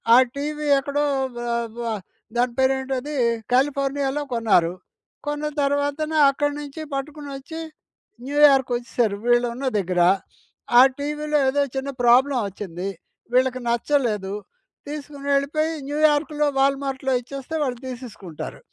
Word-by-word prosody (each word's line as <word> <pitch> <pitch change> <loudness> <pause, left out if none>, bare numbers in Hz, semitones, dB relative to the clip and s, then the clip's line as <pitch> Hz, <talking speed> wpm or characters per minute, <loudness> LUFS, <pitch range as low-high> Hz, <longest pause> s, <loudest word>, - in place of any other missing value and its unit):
ఆ - - +9 0.2
టీవీ 300 +1 -3
ఎక్కడో 290 +1 0 0.3
వ - - -4 0.4
వ - - -3 0.5
దాని 240 0 +1
పేరేంటది 265 +1 0 0.4
కాలిఫోర్నియాలో 275 +1 +1
కొన్నారు. 205 -8 +3 0.5
కొన్న 295 +1 -2
తర్వాతనే 285 +2 0
అక్కడ్నుంచి 290 +2 -3
పట్టుకొని 285 +1 -5
వచ్చి 290 +4 -8 0.7
న్యూయార్క్ 275 -2 +5
వచ్చేసారు, 240 -3 -1
వీళ్ళు 240 0 +4
ఉన్న 265 +2 -3
దగ్గర. 180 -2 0 0.8
ఆ, - - +11 0.2
టీవీలో 300 +1 -1
ఏదో 285 +2 +1
చిన్న 265 +1 -2
ప్రాబ్లమ్ 250 +2 +5
వచ్చింది. 190 -1 -5 0.4
వీళ్ళకి 255 0 +2
నచ్చలేదు. 235 -5 0 0.6
తీసుకొని 290 -1 -7
వెళ్ళిపోయి 310 +3 +1 0.2
న్యూయార్క్‌లో 295 0 +2
వాల్మార్ట్‌లో 270 -1 +1
ఇచ్చేస్తే 275 +5 -7
వాళ్ళు 250 -4 -2
తీసేసుకుంటారు. 230 - -8
275 Hz, 110 wpm, -23 LUFS, 245-290 Hz, 0.8 s, ఆ